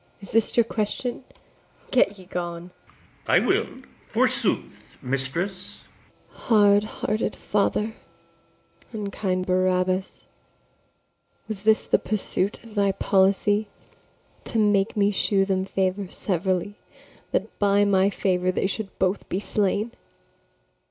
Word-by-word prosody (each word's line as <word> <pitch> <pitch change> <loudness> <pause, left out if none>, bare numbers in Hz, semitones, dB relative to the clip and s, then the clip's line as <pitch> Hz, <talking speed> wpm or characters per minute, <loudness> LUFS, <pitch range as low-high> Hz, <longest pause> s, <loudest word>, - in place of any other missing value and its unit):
is 195 - -11
this 225 +1 +1
your 235 - +7
question? 230 +4 -3 0.7
get 205 -5 +3
ye 185 - -13
gone. 175 0 -5 0.6
ITHAMORE. - - +1
I - - +7
will, - - +2 0.4
forsooth, - - 0
mistress. 135 +9 -3
[Exit.] - - -27
ABIGAIL. - - -26
Hard 205 -2 +4
hearted 215 0 -2
father, 210 +1 0 1.0
unkind 200 -3 -2
Barabas! 185 +1 0 1.2
Was 215 -3 -5
this 220 +1 +3
the - - +3
pursuit 205 -1 -2
of 230 -2 -13
thy 200 -2 +2
policy, 200 +2 +2 0.8
To 230 - 0
make 205 -1 +2
me 205 0 +3
shew 195 0 +2
them 190 -1 0
favour 190 0 -1
severally, 190 +2 -2 0.5
That - - -2
by 205 0 +4
my 195 -1 +3
favour 185 -2 0
they 185 - -1
should 195 +1 -4
both 190 +2 -1
be 185 - -1
slain? 205 +2 0
200 Hz, 120 wpm, -24 LUFS, 185-210 Hz, 1.2 s, your